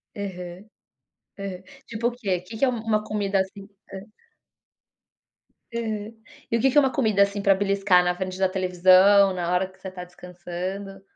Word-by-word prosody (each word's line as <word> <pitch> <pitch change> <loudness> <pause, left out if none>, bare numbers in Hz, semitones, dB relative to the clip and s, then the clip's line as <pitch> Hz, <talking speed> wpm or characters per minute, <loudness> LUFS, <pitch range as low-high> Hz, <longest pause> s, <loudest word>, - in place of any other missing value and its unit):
Aham. 180 -2 -7 0.7
Aham. 190 -2 -6 0.2
Tipo 230 +1 -2
o - - -1
quê? 200 -7 -2
Que 220 +5 -10
que 275 - +3
é - - +1
uma 225 -3 -1
comida 205 -2 -1
assim 195 +1 -4 0.2
hã? 195 - -6 1.8
Aham. 220 -2 -4 0.4
E 230 - +3
o - - -2
que 270 - +3
que 295 - 0
é - - +9
uma 270 -2 +1
comida, 220 -8 +1
assim, 200 0 +2
pra 195 0 +5
beliscar 195 -2 +2
na 180 0 0
frente 185 0 -5
da 190 -1 +2
televisão, 185 +1 +5
na 175 -1 -3
hora 180 +1 +1
que 190 - -23
você 190 - -8
tá 180 -1 -8
descansando? 180 +2 -7
195 Hz, 180 wpm, -24 LUFS, 185-210 Hz, 1.8 s, é